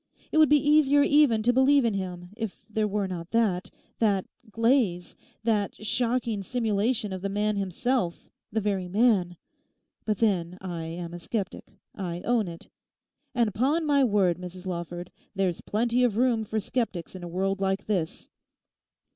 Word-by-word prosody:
It 315 - +3
would 310 -3 +6
be 295 - +7
easier 290 -1 +4
even 285 -7 +4
to 245 +2 +3
believe 265 +1 +4
in 225 - +1
him, 180 -2 -5
if 220 -3 -6
there 215 -1 0
were 205 -1 -1
not 175 -2 -6
that—that 205 -1 0 0.2
glaze, 225 -6 +1 0.3
that 215 -3 +1
shocking 230 0 0
simulation 220 0 0
of 185 - -5
the 200 - -2
man 210 +1 0
himself, 200 0 -1 0.2
the 220 +1 0
very 195 -3 -1
man. 195 -4 +2 0.7
But 215 -2 -1
then, 180 -5 0
I 175 -3 -5
am 170 +1 -6
a 175 - -6
sceptic; 200 +1 -4 0.2
I 175 -3 -4
own 230 -1 +1
it. 165 -1 -9 0.7
And 230 -4 +2
'pon 285 +9 +1
my 285 -2 +4
word, 195 -7 +2
Mrs 180 0 -9
Lawford, 175 -1 -5 0.2
there's 190 -3 0
plenty 235 +3 +1
of 225 -4 +2
room 235 -3 +2
for 220 +1 -1
sceptics 205 -6 -3
in 185 - -8
a 175 - -6
world 195 +3 -1
like 195 0 0
this. 180 -7 -2
210 Hz, 160 wpm, -27 LUFS, 180-235 Hz, 0.7 s, be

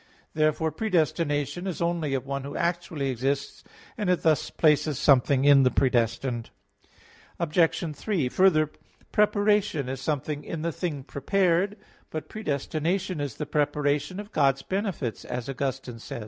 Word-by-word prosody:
Therefore 155 +1 +1
predestination 165 - 0
is 185 - -3
only 170 -5 0
of 135 - -3
one 140 0 -3
who 140 - -6
actually 170 -5 -1
exists; 135 +3 -2 0.4
and 205 -4 0
it 180 - +1
thus 155 -3 +2
places 150 -2 +2
something 135 0 +4
in 140 -1 +7
the 130 - +5
predestined. 120 -1 0 0.9
Obj. 165 -1 +1
3: 180 - -1
Further, 155 0 +3 0.4
preparation 205 -8 +2
is 130 0 -4
something 145 0 -2
in 160 -2 -5
the 170 - 0
thing 155 -5 -4
prepared. 185 +7 +1 0.3
But 155 -1 -6
predestination 165 -1 -2
is 140 -5 -4
the 150 - -4
preparation 150 +3 0
of 210 +1 -8
God's 135 -4 +2
benefits, 190 - -3
as 120 -1 -5
Augustine 135 -3 -4
says - - -12
(De - - -5
Praed. - - -4
150 Hz, 145 wpm, -26 LUFS, 135-175 Hz, 0.9 s, in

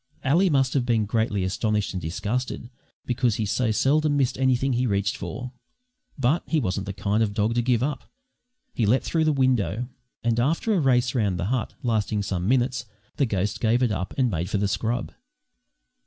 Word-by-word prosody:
Ally 170 +8 +3
must 135 -4 +2
have 135 - +2
been 115 -3 +1
greatly 110 -2 0
astonished 105 +3 -1
and 90 - -3
disgusted, 120 +8 -3 0.3
because 120 -2 +1
he 110 - -1
so 115 +3 0
seldom 145 +6 +2
missed 135 -3 +1
anything 130 0 +1
he 125 +1 +1
reached 100 -1 0
for. 115 +8 -6 0.7
But 135 +5 +2
he 160 - +1
wasn't 100 -5 -2
the - - -2
kind 100 +3 0
of 105 -2 0
dog 110 +1 +1
to 120 - +1
give 120 -1 +1
up. 140 -2 -3 0.6
He 115 - 0
leapt 125 +6 +2
through 160 -1 +1
the 155 - +3
window, 125 -4 +1 0.3
and, 115 0 +1
after 165 - +1
a 195 - +2
race 130 -3 +2
round 105 -8 0
the 85 - -2
hut, 125 -4 -2
lasting 110 -3 0
some 90 -2 -2
minutes, 125 -1 +1 0.3
the 140 - +2
ghost 100 -1 -1
gave 120 +2 +2
it 120 - +2
up, 95 -2 -3
and 125 -4 +2
made 85 +1 -2
for 105 - 0
the 100 0 +1
scrub. 115 +4 -2
120 Hz, 195 wpm, -25 LUFS, 105-130 Hz, 0.7 s, Ally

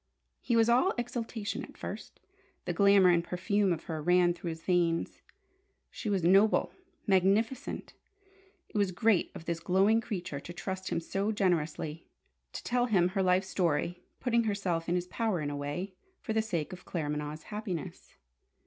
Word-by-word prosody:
He 235 - 0
was 225 -1 +5
all 250 +11 +3
exaltation 230 -3 -3
at - - -12
first. - - -7 0.5
The 175 - -1
glamour 200 0 +6
and 170 -1 +3
perfume 190 +3 0
of 165 -2 -2
her 160 -2 -4
ran 175 +2 +4
through 175 0 -6
his 160 0 -7
veins. 170 -2 0 0.7
She 220 - -5
was 195 -4 0
noble, 195 +5 +4 0.3
magnificent. 200 +5 +1 0.7
It 210 - -3
was 200 -2 +2
great 210 +1 +2
of 165 - -9
this 170 -1 -2
glowing 195 +6 +3
creature 180 -10 -4
to 170 - -9
trust 190 +1 -5
him - - 0
so 195 +5 -1
generously, 165 -5 -1 0.4
to - - -7
tell 245 0 +1
him 185 -6 +3
her 195 +1 -1
life 185 0 +3
story, 175 -1 -1 0.2
putting 235 -2 +1
herself 185 -6 -1
in 175 - +2
his 180 0 -1
power 215 0 -1
in 145 -1 -2
a - - -4
way, 145 +7 -4 0.3
for 220 - -4
the 220 - +3
sake 185 -6 -3
of 180 - -10
Claremanagh's 150 -2 -4
happiness. 195 -6 -5
185 Hz, 165 wpm, -30 LUFS, 170-210 Hz, 0.7 s, glamour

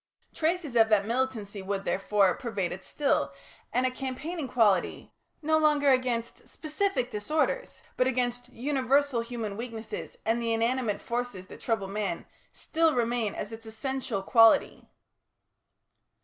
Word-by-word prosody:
Traces 325 -4 -1
of 225 -1 +5
that 205 -2 +4
militancy 225 -4 -2
would, 195 +1 -3
therefore, 195 -1 +2
pervade 200 -7 -3
it 190 - -7
still, 290 -2 0 0.4
and 250 +1 +1
a 255 - +1
campaigning 270 +5 -4
quality 215 -7 +1 0.3
no 315 +1 +3
longer 295 -2 +4
against 250 -3 -1
specific 310 -3 -1
disorders, 310 - -1
but 255 - +3
against 245 -1 -1
universal 270 0 +1
human 230 -3 -4
weaknesses, 225 -1 -6
and 225 +2 +1
the 230 -1 0
inanimate 230 -2 0
forces 235 -6 -3
that - - -12
trouble 220 -5 -1
man 195 -3 -3 0.3
still 325 -2 +1
remain 235 -3 0
as 205 - -5
its 225 0 -9
essential 225 -2 -3
quality. 225 +2 +4
240 Hz, 135 wpm, -28 LUFS, 215-265 Hz, 0.4 s, of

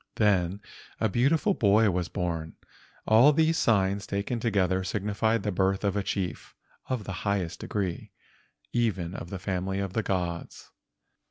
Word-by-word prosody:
Then 100 -2 +2 0.4
a 110 - +2
beautiful 145 - +2
boy 105 - +4
was 90 -1 -2
born. 80 -2 -3 0.5
All 115 +7 +7
these 160 +2 +2
signs 100 -4 +2
taken 100 +4 -2
together 95 -5 +1
signified 105 +3 0
the 105 - -1
birth 95 +1 +1
of 100 -1 0
a 100 - +1
chief 95 -4 -4 0.3
of 130 -5 -1
the 100 - -6
highest 100 -4 -1
degree—even 95 +1 -4
of 85 - -7
the 95 - -4
family 95 0 -2
of 100 -2 -3
the 110 - +1
gods. 90 -4 -4
100 Hz, 145 wpm, -28 LUFS, 95-110 Hz, 0.5 s, All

